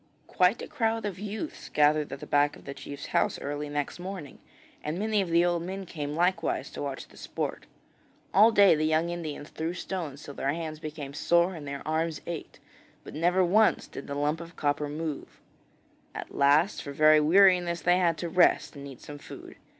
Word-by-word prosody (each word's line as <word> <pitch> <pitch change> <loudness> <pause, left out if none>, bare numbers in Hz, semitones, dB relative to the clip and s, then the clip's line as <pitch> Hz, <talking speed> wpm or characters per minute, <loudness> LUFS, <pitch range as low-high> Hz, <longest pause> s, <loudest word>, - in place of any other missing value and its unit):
Quite 185 +6 +2
a - - -6
crowd 225 -5 -1
of 195 -3 -4
youths 215 +8 -6
gathered 150 0 +3
at 135 - -7
the - - -6
back 145 0 +2
of - - -16
the 140 - -6
chief's 140 0 -8
house - - +1
early 145 +1 -4
next 145 +3 -3
morning, 180 -6 -7 0.4
and 155 +3 -3
many 215 +1 +1
of 185 - -3
the 170 +1 +4
old 175 -1 +1
men 190 +3 -5
came 150 -4 -5
likewise 175 0 0
to - - -7
watch 140 -2 -5
the - - -19
sport. - - -4 0.7
All 215 +4 +7
day 200 -4 +6
the 155 0 +1
young 160 +2 +1
Indians 155 -4 -6
threw 165 +2 -4
stones 165 -7 -5
till 140 - -8
their 140 +1 -1
hands 160 -2 -5
became 150 -3 -7
sore 170 +5 +2
and 155 -4 -8
their 140 +1 -6
arms 160 0 -1
ached, 170 -2 -6 0.5
but - - -10
never 180 +4 +2
once 215 +5 +3
did 135 - -9
the 140 - -4
lump 150 +3 0
of 170 0 -11
copper 145 0 -1
move. 155 0 -5 0.8
At - - -7
last 145 +8 +3
for 140 - -7
very 155 +1 +6
weariness 175 +1 +4
they 180 +1 +3
had 170 -3 +2
to 175 - -3
rest, 175 -1 +3
and 140 0 -8
eat 135 -3 -11
some 145 0 -9
food. - - -11
160 Hz, 200 wpm, -28 LUFS, 145-180 Hz, 0.8 s, All